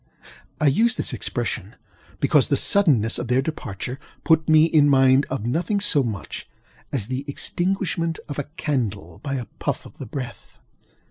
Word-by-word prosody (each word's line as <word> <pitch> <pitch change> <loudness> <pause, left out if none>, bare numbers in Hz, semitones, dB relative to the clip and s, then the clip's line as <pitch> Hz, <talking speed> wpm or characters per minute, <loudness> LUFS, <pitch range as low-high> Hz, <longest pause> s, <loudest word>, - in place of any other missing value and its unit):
I 155 - +1
use 225 - +4
this - - -2
expression, - - -3 0.4
because - - +4
the - - +2
suddenness 140 - +3
of 120 - -4
their 125 +2 +2
departure 125 - -5 0.2
put 160 -1 +3
me 155 0 +7
in 155 -3 +4
mind 135 0 +5
of 130 -5 -3
nothing 170 - 0
so 195 -8 +2
much 110 -7 -5 0.4
as 125 -8 -1
the 130 +4 -3
extinguishment 170 +1 -1
of 145 -1 -5
a 145 - -2
candle 105 - -2
by 140 -2 -3
a 125 -3 -3
puff - - -2
of - - -14
the 135 - -6
breath. 125 0 -7
140 Hz, 160 wpm, -23 LUFS, 125-160 Hz, 0.4 s, me